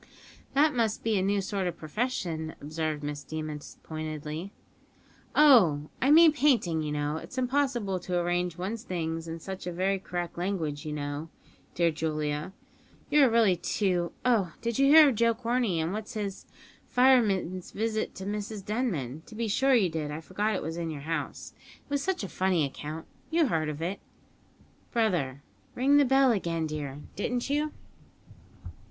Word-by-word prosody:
"That 300 +2 +4
must 225 -4 0
be 225 -1 +1
a 190 - +2
new 200 +1 +1
sort 195 -1 -2
of 175 - -4
profession," 160 -4 -3
observed 155 0 -3
Miss 145 0 -4
Deemas 155 -1 -6
pointedly. 155 +3 -5 0.8
"Oh! 190 - +6
I 260 - +3
mean 320 +2 +8
painting, 245 - +2
you 150 -1 -3
know. 150 +1 -1
It's 255 - -9
impossible 250 -7 0
to 180 0 -2
arrange 175 0 0
one's 205 +5 -3
things 165 -5 -3
in 165 0 -5
such 190 +3 -7
very 185 +2 0
correct 175 -2 -5
language, 165 -5 -2
you - - -3
know, 145 +1 -4 0.5
dear 170 -1 +3
Julia; 155 0 -2 0.6
you 295 -1 +6
are 265 - +6
really 225 -5 +4
too 180 -1 0
oh! 210 -9 +2
did 235 0 -2
you 275 - +5
hear 300 0 +9
of - - 0
Joe 230 +1 +2
Corney, 235 -6 0
and 160 +3 -1
what's 215 +3 -5
his 200 -3 -4 0.4
fireman's 210 -8 +3
visit 220 +1 -2
to 190 - -7
Mrs 205 0 -4
Denman? 170 - -2
To 220 - -11
be 230 0 -1
sure 265 +6 +3
you 210 -6 +4
did; 160 -2 -3
I 150 +1 -4
forgot 205 +6 -1
it - - -3
was 160 +2 -4
in 170 -1 -3
your 150 -3 -5
house. 165 +3 -4 0.3
It - - -23
was 285 -1 +1
such 375 - -1
a - - -3
funny 185 -4 +1
account; 150 +3 -6 0.2
you 330 0 +3
heard 155 -4 0
of 150 +1 -5
it, 185 +4 -2 0.9
brother 170 - 0 0.3
(ring 275 +3 +4
the 290 - +6
bell 270 0 +5
again, 170 -6 -1
dear), 145 -2 -5
didn't 245 +6 -2
you?" 300 +1 +1
185 Hz, 170 wpm, -28 LUFS, 160-235 Hz, 0.9 s, hear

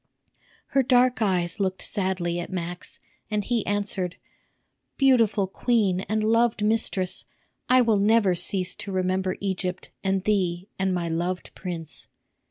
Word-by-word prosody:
Her 275 - +3
dark 250 -1 +3
eyes 180 -2 +1
looked 190 -1 -1
sadly 185 -4 0
at 175 - -6
Max, 175 -1 -4 0.3
and 210 -1 0
he 235 0 0
answered, 200 -3 0 0.8
"Beautiful 230 -7 +4
queen 195 -2 +1
and 215 0 0
loved 230 0 +2
mistress, 210 -4 +1 0.4
I 255 0 +6
will 225 -4 +3
never 205 -2 +4
cease 180 +1 +1
to 200 - -5
remember 185 0 -1
Egypt 185 -2 -3
and 195 -1 0
thee 185 -2 0
and 190 0 +1
my 175 -2 -1
loved 175 +3 -3
prince." 165 -7 -6
190 Hz, 135 wpm, -25 LUFS, 180-215 Hz, 0.8 s, I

